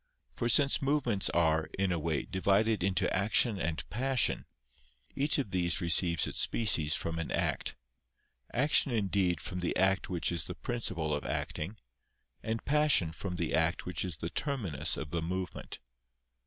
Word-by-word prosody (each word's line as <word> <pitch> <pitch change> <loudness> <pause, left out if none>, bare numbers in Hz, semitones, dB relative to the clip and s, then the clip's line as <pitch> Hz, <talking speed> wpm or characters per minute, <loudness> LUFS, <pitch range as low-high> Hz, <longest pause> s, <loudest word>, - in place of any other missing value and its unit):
For 120 - -1
since 140 +2 +4
movements 135 -8 +1
are, 80 -2 +2
in 95 -1 +1
a 85 - 0
way, 75 -4 -1
divided 100 +2 +1
into 95 0 +1
action 105 +2 +2
and 80 -3 -3
passion, 130 +2 +1 0.7
each 140 +2 +2
of 130 -9 -2
these 85 -2 0
receives 85 -1 +2
its - - -4
species 80 -9 +2
from 80 0 -3
an 80 - -3
act; - - -1 0.8
action 140 +3 +3
indeed 95 -6 +1
from 90 +3 -5
the 90 - -1
act 95 0 +2
which 85 -3 0
is 85 - -1
the - - -6
principle 90 -10 -2
of 75 - -2
acting, 95 +8 -3 0.6
and 110 0 -3
passion 145 - +3
from 90 +2 -5
the 85 -2 -2
act 80 +2 +1
which 90 -3 -3
is 90 -5 -3
the 85 - -5
terminus 100 - 0
of 75 -3 -6
the 85 - -1
movement. 90 +2 -4
95 Hz, 160 wpm, -31 LUFS, 85-115 Hz, 0.8 s, since